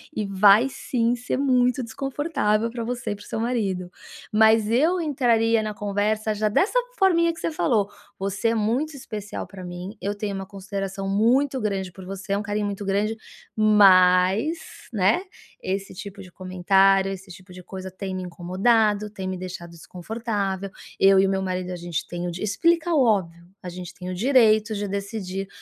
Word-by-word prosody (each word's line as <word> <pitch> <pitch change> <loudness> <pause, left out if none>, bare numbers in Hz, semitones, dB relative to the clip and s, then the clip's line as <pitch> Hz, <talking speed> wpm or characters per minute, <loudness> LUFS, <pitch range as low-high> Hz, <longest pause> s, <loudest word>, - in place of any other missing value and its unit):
E 215 - -1
vai 200 +5 +5
sim 235 -3 -1
ser 245 - -3
muito 250 -2 +2
desconfortável 260 -3 -1
pra 235 -2 -4
você 240 -2 -3
e - - -2
para - - -13
o - - -16
seu - - -4
marido. 200 -7 -2 0.4
Mas 220 0 +4
eu 325 +9 +3
entraria 230 -7 +2
na 215 -1 -3
conversa 210 +1 -1
já 215 +1 0
dessa 395 - +2 0.2
forminha 335 -4 +3
que 325 - -12
você - - -2
falou: 230 -10 +1 0.3
"Você 195 +3 -2
é 230 - 0
muito 250 +8 0
especial 215 -6 -6
pra 190 -2 -11
mim, 180 +3 -7
eu 205 +1 -2
tenho 205 -1 -4
uma 195 0 -5
consideração 195 -1 -5
muito 255 +7 +2
grande 195 -3 -2
por 190 +1 -12
você, 195 +1 -7
é - - +1
um - - -2
carinho 210 -1 -2
muito 200 0 -4
grande, 205 +3 0 0.4
mas, 195 - +5 0.3
né, 215 - +2 0.4
esse 195 +1 -3
tipo 195 +1 -9
de 180 - -14
comentário, 190 +1 +2
esse 195 0 -8
tipo 185 +1 -13
de 180 0 -10
coisa 190 +1 -8
tem 190 0 -5
me 185 - -4
incomodado, 205 +4 +1
tem 190 -2 -6
me 185 - -3
deixado 180 -2 -7
desconfortável, 195 +2 -4 0.3
eu 195 0 +6
e 195 - +4
o - - 0
meu 190 0 0
marido, 185 -1 -3
a - - -4
gente 175 -2 -4
tem 175 0 -5
o 175 - -2
di". 170 - -7
Explica 335 - +1
o 280 -4 +4
óbvio: 170 -6 0 0.2
"A 180 - -8
gente 180 0 -8
tem 180 0 -8
o - - -3
direito 220 -1 +3
de 205 0 -3
decidir 195 -1 -4
205 Hz, 185 wpm, -24 LUFS, 190-230 Hz, 0.4 s, eu